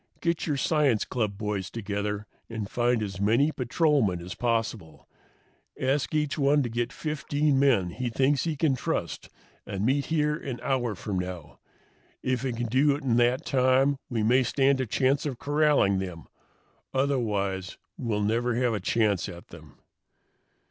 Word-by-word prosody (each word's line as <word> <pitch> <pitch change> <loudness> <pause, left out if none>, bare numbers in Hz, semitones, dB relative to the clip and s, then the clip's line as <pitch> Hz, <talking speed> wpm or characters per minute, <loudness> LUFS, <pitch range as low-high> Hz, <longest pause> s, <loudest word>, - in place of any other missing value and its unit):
Get 170 0 -1
your 145 -3 0
science 140 -6 +2
club 105 -5 -2
boys 105 -3 -3
together 105 -1 -3 0.2
and 110 -3 -4
find 120 0 +1
as 95 -2 -5
many 115 +9 +3
patrolmen 125 - +1
as 90 +1 -7
possible. 115 -8 -2 0.7
Ask 135 +3 0
each 150 -1 0
one 140 +1 +3
to 120 - -3
get 120 +2 -2
fifteen 150 -1 0
men 115 -11 +3
he 125 +5 -3
thinks 135 +4 +2
he 160 -2 -1
can 150 -1 +2
trust - - -3 0.3
and 100 +1 -3
meet 135 +3 +1
here 150 -2 +1
an 130 -5 -6
hour 125 -5 0
from 95 -1 -3
now. 90 -4 -7 0.6
If 130 -1 0
we 130 - -1
can 120 +1 -3
do 135 +5 +3
it 145 - -7
in 120 -3 +2
that 120 +2 +2
time 130 +1 +3
we 115 -3 -1
may 125 +4 +4
stand 135 +2 +2
a 130 - -2
chance 135 +6 +1
of 130 -4 -4
corralling 145 -10 +2
them. 90 -4 -6 0.7
Otherwise, 105 -9 -1 0.2
we'll 105 -3 -2
never 115 +3 +1
have 125 -1 +1
a 105 - -1
chance 105 -5 +1
at 85 0 -11
them." - - -13
120 Hz, 160 wpm, -27 LUFS, 105-140 Hz, 0.7 s, may